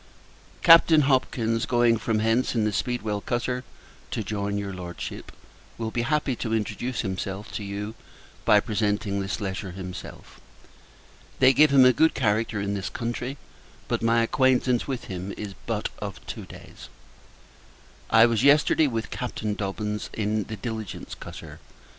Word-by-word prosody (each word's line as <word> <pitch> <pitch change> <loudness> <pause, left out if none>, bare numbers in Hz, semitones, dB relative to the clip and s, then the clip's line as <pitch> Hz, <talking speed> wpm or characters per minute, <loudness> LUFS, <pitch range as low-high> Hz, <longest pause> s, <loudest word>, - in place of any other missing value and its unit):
Captain 165 -2 +8
Hopkins, 120 -4 +1
going 120 -1 +4
from 110 0 -1
hence 115 +4 +1
in 115 - +2
the 105 - +1
Speedwell 110 -3 -2
cutter 125 +2 -2 0.5
to 110 - -3
join 100 0 -2
your 100 -1 -4
Lordship, 90 -1 -7 0.5
will 110 -1 -3
be 120 - -1
happy 140 +1 0
to 115 -1 -1
introduce 120 +3 -2
himself 95 0 -4
to 105 - -5
you 100 +2 -5 0.5
by 105 - +6
presenting 105 -2 -1
this 95 +2 -3
letter 95 -2 -4
himself. 90 -1 -9 1.0
They 130 0 +6
give 150 +2 +5
him 135 -2 +7
a 125 - +6
good 160 +6 +3
character 110 -2 0
in 100 0 -2
this 100 0 -3
country, 125 +3 -4 0.5
but - - -1
my 115 0 +3
acquaintance 125 0 +2
with 130 -3 -3
him 95 +1 -6
is 105 -2 -6
but - - -1
of - - -7
two - - -7
days. - - -12 1.2
I 115 0 +7
was 115 -1 +1
yesterday 150 +2 +5
with 115 -3 -3
Captain 110 -4 -3
Dobbins, 105 +1 -3
in 105 -1 -1
the 110 - -6
Diligence 110 -3 -6
cutter. - - -10
110 Hz, 150 wpm, -25 LUFS, 100-125 Hz, 1.2 s, Captain